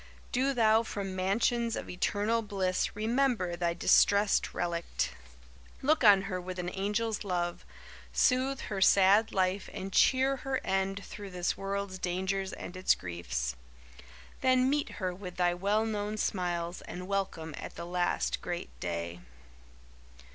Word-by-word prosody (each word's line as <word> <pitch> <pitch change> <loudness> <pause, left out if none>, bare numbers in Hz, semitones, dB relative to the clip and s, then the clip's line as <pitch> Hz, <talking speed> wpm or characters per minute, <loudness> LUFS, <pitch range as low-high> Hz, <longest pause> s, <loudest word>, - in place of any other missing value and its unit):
Do 270 +2 +1
thou 220 -1 +5
from 200 -4 -5
mansions 230 +5 +1
of - - -5
eternal 205 +5 0
bliss 195 -4 -1
Remember 220 -4 +1
thy 170 -1 -1
distressed 200 +3 +4
relict. 170 - -2 0.7
Look 305 +1 +3
on 200 -3 +7
her 185 -2 -3
with 185 +1 -6
an 180 0 -2
angel's 210 +4 -1
love 175 -3 -2 0.5
Soothe 265 +1 +2
her 195 -2 -4
sad 200 +3 +5
life 185 +1 0
and 190 0 -6
cheer 265 +1 +4
her 265 0 -2
end 195 +1 -1
Through 205 -1 -8
this 180 -1 -1
world's 195 -1 -4
dangers 190 +2 -1
and 175 - -8
its 185 +1 +3
griefs. 65 -9 -4 0.8
Then 255 0 +3
meet 295 0 0
her 185 -3 -2
with 180 -1 -8
thy 175 -1 +2
well 200 +5 +1
known 210 -1 -2
smiles 175 -3 -2
and 180 +1 -7
welcome 190 -5 -2
At - - -8
the 170 - -6
last 175 0 0
great 175 0 -4
day. 85 0 -4
195 Hz, 140 wpm, -30 LUFS, 180-220 Hz, 0.8 s, on